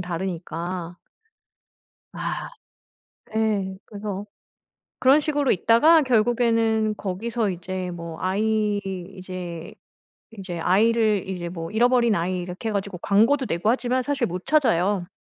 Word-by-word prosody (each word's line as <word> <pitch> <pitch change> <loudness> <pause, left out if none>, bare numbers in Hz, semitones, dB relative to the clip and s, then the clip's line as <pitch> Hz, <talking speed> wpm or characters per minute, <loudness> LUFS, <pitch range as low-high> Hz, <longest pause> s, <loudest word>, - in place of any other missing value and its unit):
다르니까 175 0 -4 1.2
아 - - -4 0.9
예. 205 -4 0
그래서 205 -1 -5 0.8
그런 270 +4 +6
식으로 290 -3 +1
있다가 295 - +5
결국에는 225 -3 +2
거기서 215 +3 -2
이제 185 0 -4
뭐 170 -1 -7
아이 210 +2 +1 0.4
이제 180 -3 -7 0.7
이제 185 -3 -5
아이를 210 +2 +2
이제 175 -2 -4
뭐 165 -2 -6
잃어버린 235 0 +3
아이 180 +2 -1
이렇게 180 +5 -5
해 - - -3
가지고 200 -2 -3
광고도 230 +9 +3
내고 170 +6 +1
하지만 250 +1 0
사실 275 -2 0
못 180 0 -6
찾아요. 205 - +2
205 Hz, 260 characters per minute, -24 LUFS, 180-230 Hz, 1.2 s, 그런